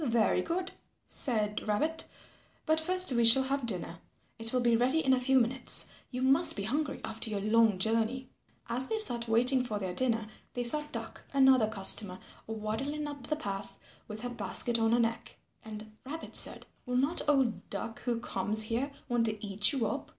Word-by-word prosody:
"Very 230 Hz, -5 st, +1 dB
good," 365 Hz, +2 st, -4 dB, 0.4 s
said 215 Hz, -5 st, -2 dB
Rabbit, 310 Hz, +10 st, -1 dB, 0.6 s
"but 315 Hz, 0 st, +2 dB
first 365 Hz, +1 st, -1 dB
we 235 Hz, -2 st, +1 dB
shall 230 Hz, +4 st, +7 dB
have 270 Hz, -1 st, -2 dB
dinner. 180 Hz, -4 st, -5 dB, 0.4 s
It 225 Hz, 0 st, -3 dB
will 255 Hz, -, 0 dB
be 235 Hz, -1 st, +2 dB
ready 260 Hz, +7 st, +1 dB
in 265 Hz, -, +4 dB
a 260 Hz, -, +2 dB
few 265 Hz, +1 st, +3 dB
minutes. 250 Hz, +2 st, +5 dB, 0.2 s
You 250 Hz, 0 st, -4 dB
must 270 Hz, +6 st, +4 dB
be 200 Hz, -, -4 dB
hungry 280 Hz, +7 st, -3 dB
after 225 Hz, +1 st, -4 dB
your 210 Hz, -2 st, -3 dB
long 215 Hz, 0 st, +2 dB
journey." 225 Hz, +5 st, -1 dB, 0.4 s
As 255 Hz, +2 st, -1 dB
they 445 Hz, -, -2 dB
sat 240 Hz, -, +2 dB
waiting 250 Hz, +3 st, +3 dB
for 215 Hz, -4 st, -4 dB
their 190 Hz, -3 st, -4 dB
dinner 230 Hz, 0 st, -1 dB, 0.3 s
they 245 Hz, -, -2 dB
saw 300 Hz, +6 st, +4 dB
Duck, 230 Hz, -1 st, -7 dB
another 265 Hz, -4 st, +4 dB
customer, 195 Hz, -2 st, +3 dB, 0.3 s
waddling 225 Hz, +8 st, -4 dB
up 285 Hz, -3 st, -8 dB
the 305 Hz, -, -1 dB
path 200 Hz, -9 st, -6 dB, 0.3 s
with 215 Hz, 0 st, -8 dB
her 245 Hz, -, -4 dB
basket 235 Hz, +1 st, -1 dB
on 225 Hz, 0 st, +1 dB
her -, -, +3 dB
neck. 230 Hz, -1 st, -3 dB, 0.3 s
And 215 Hz, 0 st, -10 dB
Rabbit 315 Hz, +5 st, -7 dB
said, -, -, +4 dB, 0.2 s
"Will 250 Hz, 0 st, -1 dB
not 280 Hz, +7 st, 0 dB
old 265 Hz, -6 st, 0 dB
Duck 225 Hz, -, -5 dB
who 240 Hz, -2 st, -2 dB
comes 220 Hz, -2 st, 0 dB
here 235 Hz, +6 st, -2 dB, 0.2 s
want 240 Hz, -1 st, 0 dB
to 215 Hz, -1 st, -4 dB
eat 200 Hz, +1 st, +3 dB
you 265 Hz, -6 st, -1 dB
up?" -, -, -4 dB
235 Hz, 185 wpm, -30 LUFS, 220-265 Hz, 0.6 s, shall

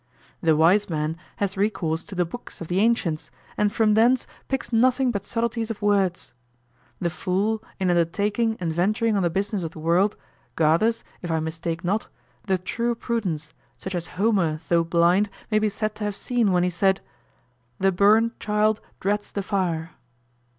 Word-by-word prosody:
The 160 Hz, -2 st, +4 dB
wise 180 Hz, +7 st, +4 dB
man 155 Hz, -1 st, -1 dB, 0.2 s
has 200 Hz, -1 st, -2 dB
recourse 190 Hz, -5 st, 0 dB
to 195 Hz, -, -9 dB
the 180 Hz, -1 st, +1 dB
books 240 Hz, +9 st, -9 dB
of 165 Hz, -, -7 dB
the 180 Hz, +2 st, +1 dB
ancients, 205 Hz, -8 st, +1 dB, 0.3 s
and 210 Hz, -1 st, +2 dB
from 220 Hz, -1 st, +3 dB
thence 235 Hz, +4 st, +4 dB, 0.2 s
picks 270 Hz, -2 st, -3 dB
nothing 255 Hz, +2 st, +3 dB
but 200 Hz, -4 st, -4 dB
subtleties 230 Hz, -1 st, -1 dB
of 225 Hz, -, -4 dB
words. 200 Hz, -4 st, +1 dB, 0.7 s
The 170 Hz, -2 st, -1 dB
fool, 200 Hz, +5 st, -1 dB, 0.2 s
in 185 Hz, -2 st, +2 dB
undertaking 205 Hz, +7 st, +1 dB
and 165 Hz, -3 st, -2 dB
venturing 215 Hz, +6 st, +1 dB
on 200 Hz, -, +2 dB
the 175 Hz, -, +2 dB
business 200 Hz, +3 st, -1 dB
of 165 Hz, -1 st, -5 dB
the -, -, -10 dB
world, 175 Hz, +6 st, +2 dB, 0.4 s
gathers, 170 Hz, +9 st, +2 dB, 0.2 s
if 175 Hz, -, -5 dB
I 160 Hz, -1 st, +1 dB
mistake 165 Hz, +2 st, -4 dB
not, 200 Hz, +5 st, 0 dB, 0.4 s
the 190 Hz, -1 st, +2 dB
true 235 Hz, +6 st, -2 dB
prudence, 190 Hz, -11 st, -3 dB, 0.2 s
such 190 Hz, +9 st, -6 dB
as 175 Hz, -2 st, -3 dB
Homer 190 Hz, -7 st, +2 dB
though 170 Hz, -1 st, +4 dB
blind 175 Hz, +5 st, +3 dB, 0.2 s
may 215 Hz, -, +4 dB
be 215 Hz, 0 st, +1 dB
said 215 Hz, +1 st, -2 dB
to 215 Hz, -, -5 dB
have 205 Hz, -1 st, -2 dB
seen 235 Hz, -4 st, +1 dB
when 180 Hz, -1 st, +3 dB
he 180 Hz, -, +1 dB
said, 190 Hz, +3 st, +2 dB, 0.8 s
"The 195 Hz, 0 st, +3 dB
burnt 215 Hz, +5 st, +3 dB
child 210 Hz, +1 st, +1 dB, 0.2 s
dreads 205 Hz, +2 st, -1 dB
the 200 Hz, -, -3 dB
fire." 175 Hz, -5 st, -1 dB
195 Hz, 175 wpm, -24 LUFS, 170-215 Hz, 0.8 s, The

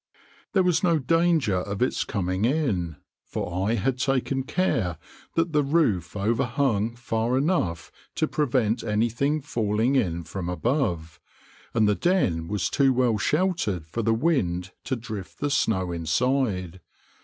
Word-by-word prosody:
There 190 Hz, -, +4 dB
was 175 Hz, -2 st, +2 dB
no 170 Hz, -3 st, +3 dB
danger 160 Hz, -, +2 dB
of 100 Hz, +2 st, -3 dB
its 125 Hz, -, 0 dB
coming 95 Hz, -1 st, -2 dB
in, 110 Hz, -, 0 dB, 0.3 s
for 90 Hz, +3 st, -3 dB
I 115 Hz, -, +2 dB
had 130 Hz, +2 st, -1 dB
taken 135 Hz, 0 st, 0 dB
care 115 Hz, -, 0 dB, 0.4 s
that 165 Hz, 0 st, +1 dB
the 150 Hz, -, +4 dB
roof 135 Hz, -, +1 dB
overhung 115 Hz, +1 st, 0 dB
far 120 Hz, +1 st, -1 dB
enough 130 Hz, -, 0 dB, 0.2 s
to 155 Hz, -, +1 dB
prevent 120 Hz, -7 st, 0 dB
anything 120 Hz, +7 st, 0 dB
falling 115 Hz, 0 st, 0 dB
in 85 Hz, -10 st, 0 dB
from 90 Hz, +1 st, -5 dB
above, 90 Hz, -, -1 dB, 0.6 s
and 110 Hz, -2 st, +4 dB
the 105 Hz, -, +4 dB
den 100 Hz, -, +1 dB
was 105 Hz, -1 st, -1 dB
too 135 Hz, -1 st, +3 dB
well 125 Hz, -4 st, +2 dB
sheltered 150 Hz, -, 0 dB
for 100 Hz, +9 st, -3 dB
the 115 Hz, 0 st, +1 dB
wind 95 Hz, -, 0 dB
to 130 Hz, -, -1 dB
drift 110 Hz, -5 st, -7 dB
the 145 Hz, 0 st, -1 dB
snow 95 Hz, -9 st, +1 dB
inside. 95 Hz, -, 0 dB
115 Hz, 145 wpm, -25 LUFS, 95-140 Hz, 0.6 s, There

